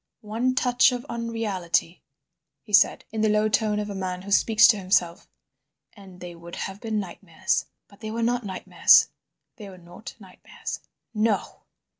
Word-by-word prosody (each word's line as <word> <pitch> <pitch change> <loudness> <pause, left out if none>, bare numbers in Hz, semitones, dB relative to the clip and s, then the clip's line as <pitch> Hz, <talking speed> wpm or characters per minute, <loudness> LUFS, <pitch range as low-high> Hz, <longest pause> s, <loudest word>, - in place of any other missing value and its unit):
"One 230 +5 -1
touch 250 0 +3
of 245 +1 -5
unreality," 215 -7 -2 0.6
he 210 - -15
said, 200 - +4
in 220 0 -3
the 215 - +2
low 210 0 +2
tone 215 0 +1
of 210 0 -3
a 205 - -6
man 185 -1 -5
who 200 - -9
speaks 215 +2 +5
to 220 - +4
himself, 185 -3 0 0.7
"and 190 -3 -15
they 175 -1 -8
would 170 0 -11
have 195 +1 -6
been 220 -2 -2
nightmares. 180 -3 -3 0.2
But 200 - -21
they 220 - -6
were 230 +1 -3
not 245 +1 0
nightmares—they 200 +2 +1
were 185 - -13
not 175 +5 -12
nightmares. 190 -5 -9 0.3
No!" 215 -2 -1
210 Hz, 160 wpm, -24 LUFS, 185-225 Hz, 0.7 s, speaks